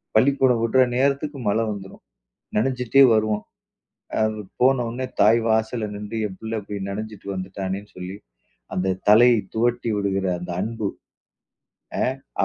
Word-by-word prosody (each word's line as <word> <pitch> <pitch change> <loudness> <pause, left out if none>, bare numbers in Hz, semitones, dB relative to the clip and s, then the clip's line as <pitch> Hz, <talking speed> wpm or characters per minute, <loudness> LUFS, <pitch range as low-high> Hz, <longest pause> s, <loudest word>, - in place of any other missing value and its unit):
பள்ளிக்கூடம் 130 0 +4
வுடுற 130 +3 +4 0.2
நேரத்துக்கு 140 +2 0
மழை 110 +3 +2
வந்துரும். 95 -1 -9 0.5
நனஞ்சிட்டே 125 +3 +4
வருவோம். 110 -1 0 0.8
அது 110 0 0 0.2
போனவுன்ன 125 -1 +2 0.2
தாய் 115 +2 +6
வாசல்ல 110 0 +1
நின்று, 105 +2 -6
என் 95 -2 -11
பிள்ள 110 0 -3
இப்படி 100 0 -6
நனைஞ்சிட்டு 105 0 -7
வந்துட்டானேன்னு 95 +2 -5
சொல்லி, 90 +1 -6 0.6
அந்த 95 0 0
தலையை 120 +2 +7 0.2
துவட்டி 120 +1 +1
விடுகிற 95 -1 0
அந்த 90 0 -6
அன்பு 110 -1 -2 1.6
அ - - +5
110 Hz, 120 wpm, -23 LUFS, 100-120 Hz, 1.6 s, தலையை